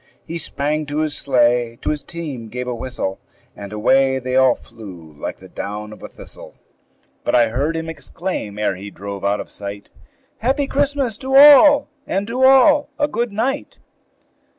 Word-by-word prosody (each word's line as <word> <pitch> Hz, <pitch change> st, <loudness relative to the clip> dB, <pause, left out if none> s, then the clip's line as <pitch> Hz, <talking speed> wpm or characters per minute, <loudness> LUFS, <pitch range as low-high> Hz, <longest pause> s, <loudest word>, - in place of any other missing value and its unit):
He 170 Hz, +1 st, -5 dB
sprang 150 Hz, 0 st, -2 dB
to 145 Hz, +1 st, -2 dB
his 155 Hz, -2 st, -2 dB
sleigh, 120 Hz, -3 st, +1 dB
to -, -, 0 dB
his 150 Hz, -1 st, -3 dB
team 145 Hz, -10 st, -7 dB
gave 125 Hz, +3 st, -6 dB
a 125 Hz, -, -2 dB
whistle, 120 Hz, -5 st, -4 dB, 0.4 s
And 100 Hz, -1 st, -9 dB
away 130 Hz, +5 st, +2 dB
they 130 Hz, 0 st, -3 dB
all 130 Hz, -1 st, +5 dB
flew 95 Hz, -9 st, -13 dB
like -, -, -6 dB
the 95 Hz, -, -14 dB
down 105 Hz, +3 st, -6 dB
of -, -, -15 dB
a -, -, -7 dB
thistle; -, -, -12 dB, 0.7 s
But -, -, 0 dB
I 120 Hz, -2 st, +4 dB
heard 140 Hz, +8 st, -1 dB
him 160 Hz, 0 st, -4 dB
exclaim, 160 Hz, -, -5 dB
ere 105 Hz, -2 st, 0 dB
he 100 Hz, +2 st, -8 dB
drove 100 Hz, +1 st, -8 dB
out 100 Hz, +1 st, +1 dB
of -, -, -8 dB
sight, 100 Hz, 0 st, -8 dB, 0.5 s
"Happy 270 Hz, +5 st, 0 dB
Christmas 275 Hz, -5 st, -1 dB
to 265 Hz, 0 st, -2 dB
all, 290 Hz, 0 st, +8 dB, 0.2 s
and 195 Hz, +2 st, -1 dB
to 240 Hz, +4 st, -3 dB
all 270 Hz, +3 st, +5 dB
a 295 Hz, -1 st, +1 dB
good 240 Hz, -6 st, -2 dB
night!" 260 Hz, +7 st, -2 dB
135 Hz, 175 wpm, -19 LUFS, -, 0.7 s, all